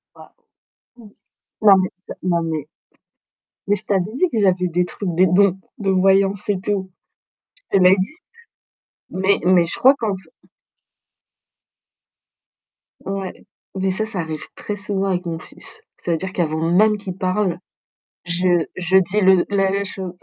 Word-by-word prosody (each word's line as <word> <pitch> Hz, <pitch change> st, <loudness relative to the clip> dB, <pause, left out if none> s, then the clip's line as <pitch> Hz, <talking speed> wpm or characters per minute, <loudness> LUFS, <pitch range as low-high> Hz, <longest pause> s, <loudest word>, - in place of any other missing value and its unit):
Bah -, -, -15 dB, 0.6 s
mmh. 220 Hz, -4 st, -15 dB, 0.5 s
Non, 195 Hz, -2 st, +8 dB
mais 185 Hz, -1 st, 0 dB, 0.2 s
tu -, -, -10 dB
as -, -, -22 dB
non, 170 Hz, -2 st, +1 dB
mais 155 Hz, -3 st, -3 dB, 1.0 s
mais 205 Hz, -, +3 dB
je 215 Hz, -, -14 dB
t'avais 195 Hz, 0 st, 0 dB
dit 365 Hz, +8 st, +2 dB
que 220 Hz, -3 st, -1 dB
j'avais 185 Hz, -2 st, +2 dB
des 175 Hz, +1 st, +1 dB
trucs, 190 Hz, +1 st, -5 dB
des 185 Hz, +2 st, +5 dB
dons, 190 Hz, +1 st, +3 dB, 0.2 s
de 195 Hz, -2 st, -2 dB
voyance 195 Hz, +1 st, +2 dB
et 195 Hz, -2 st, +1 dB
tout. 190 Hz, -1 st, -2 dB, 0.7 s
Je -, -, -1 dB
te -, -, +3 dB
l'ai 185 Hz, +2 st, +7 dB
dit. 195 Hz, -, -3 dB, 0.9 s
Mais 190 Hz, +1 st, +1 dB
mais 180 Hz, -2 st, +4 dB
je -, -, -4 dB
crois 265 Hz, +2 st, +6 dB
qu'en 210 Hz, -4 st, -1 dB
fait 180 Hz, -3 st, -20 dB, 2.5 s
Ouais, 195 Hz, -1 st, -4 dB, 0.4 s
mais 190 Hz, 0 st, 0 dB
ça, 215 Hz, +3 st, -2 dB
ça 205 Hz, -4 st, -6 dB
arrive 160 Hz, -2 st, -4 dB
très 210 Hz, -, -5 dB
souvent 195 Hz, 0 st, -2 dB
avec 180 Hz, -1 st, -1 dB
mon 165 Hz, -1 st, -4 dB
fils. -, -, -15 dB, 0.4 s
C'est-à-dire 175 Hz, +2 st, -2 dB
qu'avant 160 Hz, -1 st, -1 dB
même 210 Hz, +3 st, +4 dB
qu'il 190 Hz, -3 st, -7 dB
parle, 185 Hz, -1 st, -1 dB, 0.6 s
je 175 Hz, -1 st, +1 dB
je 185 Hz, +1 st, +2 dB
dis 195 Hz, +3 st, +1 dB
le 190 Hz, -2 st, +5 dB
la 195 Hz, 0 st, +1 dB
chose. 190 Hz, -2 st, -6 dB
190 Hz, 155 wpm, -20 LUFS, 180-200 Hz, 2.5 s, Non